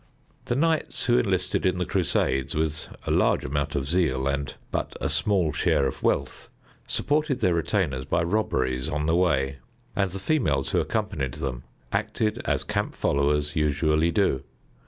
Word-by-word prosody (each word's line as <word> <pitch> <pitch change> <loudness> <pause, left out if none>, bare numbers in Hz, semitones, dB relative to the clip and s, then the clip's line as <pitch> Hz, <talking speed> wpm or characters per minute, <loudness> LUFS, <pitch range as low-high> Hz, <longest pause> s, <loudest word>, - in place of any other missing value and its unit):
The 120 - -1
knights 160 +3 +1
who 120 0 +4
enlisted 95 -6 0
in 90 -1 +2
the 90 - 0
Crusades, 75 -8 0
with 80 0 -1 0.2
a - - -1
large - - +2
amount 70 +1 -2
of 70 -1 -1
zeal 75 -6 +1
and 70 -1 -1 0.2
but - - -2
a - - -1
small 80 +1 +1
share 70 - +2
of - - -3
wealth, 70 -1 -1 0.4
supported 145 -2 +1
their 90 -7 +3
retainers 80 -6 0
by 85 - +1
robberies 65 -9 0
on 75 -1 -1
the 80 +1 +2
way, 70 -7 +2 0.4
and 100 -1 +1
the 95 - -6
females 95 - 0
who - - +2
accompanied 65 -2 -2
them 65 -3 -4 0.3
acted 105 +1 -1
as - - 0
camp - - -2
followers 75 +1 +1
usually 75 +1 +2
do. 85 -6 +2
80 Hz, 160 wpm, -26 LUFS, 70-95 Hz, 0.4 s, who